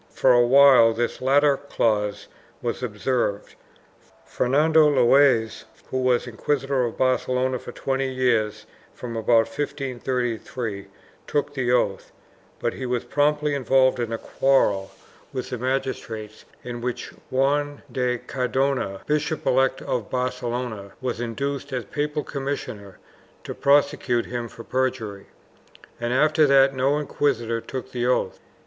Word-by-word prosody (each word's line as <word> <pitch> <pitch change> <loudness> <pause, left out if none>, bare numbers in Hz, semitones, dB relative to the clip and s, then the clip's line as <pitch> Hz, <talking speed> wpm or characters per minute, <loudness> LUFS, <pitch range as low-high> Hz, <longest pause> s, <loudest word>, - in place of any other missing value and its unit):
For 130 - +3
a 120 0 +5
while 130 -3 +7
this 120 +2 -2
latter 140 +2 +4
clause 105 -7 -1 0.3
was 120 +1 -3
observed. 105 -2 -2 0.7
Fernando 150 +4 +3
Loazes, 130 -4 +3 0.3
who 130 - 0
was 125 -1 +2
inquisitor 135 +3 -1
of 115 - -5
Barcelona 130 0 +1
for - - -9
twenty 135 +1 -2
years 110 -5 0 0.3
from 120 -2 -7
about 115 0 +3
1533, 125 -6 -3 0.4
took 145 -1 -1
the 130 -3 -1
oath, 120 -5 0 0.5
but - - -2
he 130 - -5
was 125 -1 -1
promptly 150 0 +1
involved 130 -1 +3
in 115 -1 -2
a 115 - -1
quarrel 105 -8 +1 0.4
with 130 -1 -5
the 125 - -3
magistrates 115 -4 -4 0.2
in 120 -1 -6
which 125 0 -4 0.2
Juan 145 +2 0
de 125 0 0
Cardona, 125 -5 -1
Bishop 150 +1 -1
elect 130 +1 +2
of 120 -5 -3
Barcelona, 120 -5 -3
was 125 -2 -3
induced, 140 +4 -3
as 125 -4 -3
papal 150 +5 -2
commissioner, 135 -8 -5 0.5
to - - -6
prosecute 140 -4 +2
him 120 -1 -4
for 115 - -11
perjury, 125 -7 -2 0.7
and 120 0 -2
after 150 +3 +4
that 135 0 +5
no 135 +2 +1
inquisitor 120 -6 -1
took 130 +2 -7
the 120 -1 -1
oath. 125 - 0
130 Hz, 130 wpm, -24 LUFS, 115-140 Hz, 0.7 s, while